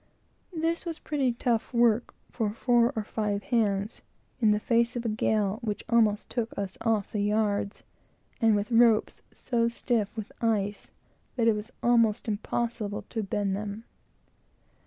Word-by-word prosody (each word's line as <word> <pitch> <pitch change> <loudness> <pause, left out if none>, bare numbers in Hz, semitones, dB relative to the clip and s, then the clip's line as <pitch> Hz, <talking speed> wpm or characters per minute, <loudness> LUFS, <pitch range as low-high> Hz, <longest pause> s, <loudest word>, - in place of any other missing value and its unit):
This 330 +1 0
was 335 -3 -4
pretty 275 -5 0
tough 235 -1 -1
work 235 -1 +2 0.2
for 220 -3 -1
four 240 -1 +3
or 220 - -1
five 210 -1 -2
hands, 210 -3 0 0.4
in 220 -3 +4
the 210 0 +3
face 235 +2 +1
of 240 0 -3
a - - +1
gale 215 -1 0
which 210 -3 -3
almost 220 -3 +3
took 235 -2 -3
us 195 -2 -3
off 220 -3 0
the 210 - -1
yards, 205 -1 0 0.6
and 225 -2 +5
with 205 +3 -2
ropes 230 -2 +4
so 235 -2 0
stiff 235 -3 0
with 220 0 -5
ice 205 -3 0 0.5
that 235 -3 +2
it 225 - +5
was 210 +2 -5
almost 230 -2 +3
impossible 215 0 -2
to 225 - -2
bend 200 -1 -1
them. 205 +2 -5
220 Hz, 155 wpm, -28 LUFS, 205-235 Hz, 0.6 s, and